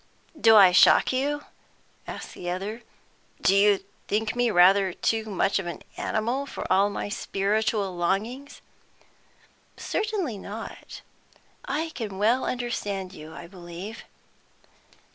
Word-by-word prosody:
"Do 225 -7 +5
I 195 -3 +8
shock 185 +7 +6
you?" 290 +3 -1 0.6
asked - - -7
the 175 - -6
other. 200 +6 -4 0.6
"Do 195 - +3
you 200 -1 +4 0.2
think 215 +2 -1
me 245 -1 +2
rather 190 0 +5
too 225 +3 0
much 200 -1 0
of 190 - -5
an 170 - -6
animal, 240 +6 -2
for - - -6
all 195 +2 +4
my 205 - -4
spiritual 205 -1 -1
longings?" 215 +11 -2 1.2
"Certainly 390 - -2
not, 210 +4 -8 0.6
I 310 +4 -2
can 210 -5 -5
well 230 +6 +2
understand 205 -6 -3
you, 155 -3 -10
I - - -9
believe." 180 +4 -9
210 Hz, 125 wpm, -26 LUFS, 190-240 Hz, 1.2 s, I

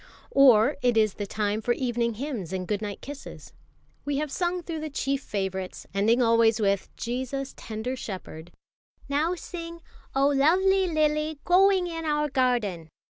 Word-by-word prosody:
Or 265 -1 +6
it 245 -2 +2
is 215 -3 +3
the 205 - -5
time 210 +1 -1
for 240 +2 +1
evening 235 -2 -1
hymns 235 - -4
and 185 -1 -3
good 210 -1 -1
night 205 -2 -5
kisses. 285 0 -10 0.5
We 285 -1 -1
have 300 -1 -2
sung 355 +1 -1
through 325 -1 -5
the 310 0 -4
chief 275 -1 -1
favourites, 190 -4 -4
ending 225 +5 +3
always 230 -1 +4
with, 200 -2 +1
"Jesus, 260 +3 -4
tender 225 +4 -5
Shepherd." 180 -7 -8 0.6
"Now 305 +5 +1
sing, 335 -1 -8 0.4
'Oh, 275 +1 +4
luvvly 375 +6 +3
lily 305 0 +1
g'oing 375 0 +4
in 330 -1 -5
our 300 -1 +1
garden!'" 235 - 0
260 Hz, 155 wpm, -26 LUFS, 215-305 Hz, 0.6 s, Or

